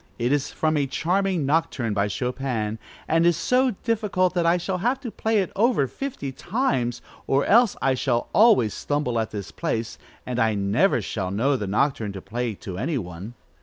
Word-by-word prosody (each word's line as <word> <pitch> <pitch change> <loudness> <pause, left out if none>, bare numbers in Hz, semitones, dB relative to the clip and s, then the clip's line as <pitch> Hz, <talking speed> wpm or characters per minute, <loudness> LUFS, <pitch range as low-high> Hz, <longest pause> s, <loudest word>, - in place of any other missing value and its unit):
It 120 +2 0
is 145 -1 0
from 155 -1 0
a 140 -2 +1
charming 180 +3 0
Nocturne, 140 -6 0
by 100 0 +1
Chopin, 120 -1 -2 0.3
and 165 +1 +3
is 170 -1 +4
so 250 +4 +2
difficult 205 -5 +1
that 175 -2 +1
I 170 +1 +4
shall 180 +1 -3
have 245 +7 0
to 235 - -5
play 220 -1 +1
it 185 - -4
over 220 - +3
fifty 195 - -5
times, 130 - -1 0.2
or 135 +1 +2
else 235 0 +5
I 135 - +3
shall 125 -2 0
always 205 - +5
stumble 145 -5 -1
at 110 - -1
this 100 -2 -6
place, 115 0 -3 0.3
and 125 -1 -3
I 110 -2 +2
never 100 - +2
shall 95 -4 -3
know 120 +9 +1
the 105 -6 -3
Nocturne 110 0 0
to 95 - -6
play 115 +3 -3
to 95 -2 -7
any 145 +6 -1
one. 95 +2 -7
135 Hz, 190 wpm, -24 LUFS, 115-185 Hz, 0.3 s, else